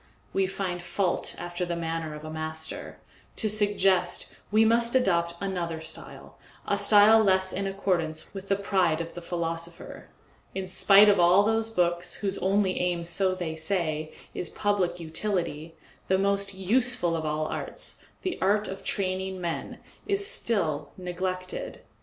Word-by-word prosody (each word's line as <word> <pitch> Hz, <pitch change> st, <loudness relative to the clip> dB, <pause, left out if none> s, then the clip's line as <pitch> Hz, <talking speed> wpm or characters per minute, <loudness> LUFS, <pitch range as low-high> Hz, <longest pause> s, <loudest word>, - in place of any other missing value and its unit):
We 195 Hz, -1 st, +2 dB
find 185 Hz, -2 st, -3 dB
fault 175 Hz, +1 st, -1 dB
after 175 Hz, +1 st, -4 dB
the 175 Hz, -1 st, -2 dB
manner 165 Hz, -2 st, -3 dB
of 150 Hz, +1 st, -9 dB
a 155 Hz, -, -6 dB
master; 160 Hz, 0 st, -5 dB, 0.4 s
to 215 Hz, -, +1 dB
suggest, 205 Hz, -3 st, +1 dB, 0.2 s
we 215 Hz, +2 st, +4 dB
must 235 Hz, +2 st, +2 dB
adopt 170 Hz, -8 st, +2 dB
another 175 Hz, -4 st, -3 dB
style, 160 Hz, -, -8 dB, 0.3 s
a 200 Hz, -, +1 dB
style 210 Hz, +2 st, +6 dB
less 190 Hz, -2 st, +2 dB
in 195 Hz, +1 st, -2 dB
accordance 175 Hz, -5 st, -1 dB
with 195 Hz, 0 st, -8 dB
the 195 Hz, -, +2 dB
pride 190 Hz, -5 st, +1 dB
of 165 Hz, 0 st, -5 dB
the 175 Hz, -, -7 dB
philosopher. 170 Hz, -1 st, -5 dB, 0.5 s
In 190 Hz, 0 st, -2 dB
spite 195 Hz, +2 st, +6 dB
of 200 Hz, -2 st, +5 dB
all 175 Hz, +3 st, +6 dB
those 225 Hz, +1 st, +1 dB
books, 175 Hz, -3 st, +1 dB
whose 200 Hz, -1 st, -2 dB
only 195 Hz, 0 st, +1 dB
aim, 175 Hz, -1 st, -1 dB
so 185 Hz, +2 st, +1 dB
they 170 Hz, -3 st, -4 dB
say, 160 Hz, -2 st, -2 dB, 0.2 s
is 175 Hz, -, -3 dB
public 190 Hz, -4 st, 0 dB
utility, 165 Hz, -2 st, -3 dB, 0.3 s
the 190 Hz, -, +3 dB
most 200 Hz, 0 st, 0 dB
useful 195 Hz, -2 st, +1 dB
of 160 Hz, -, -2 dB
all 155 Hz, 0 st, -1 dB
arts, -, -, -5 dB, 0.2 s
the 370 Hz, -2 st, -2 dB
art 205 Hz, +2 st, +2 dB
of 195 Hz, 0 st, -7 dB
training 190 Hz, -1 st, -2 dB
men, 170 Hz, -2 st, -4 dB, 0.3 s
is 400 Hz, 0 st, +3 dB
still 160 Hz, -, +1 dB
neglected. 185 Hz, -, -4 dB
185 Hz, 155 wpm, -27 LUFS, 170-200 Hz, 0.5 s, style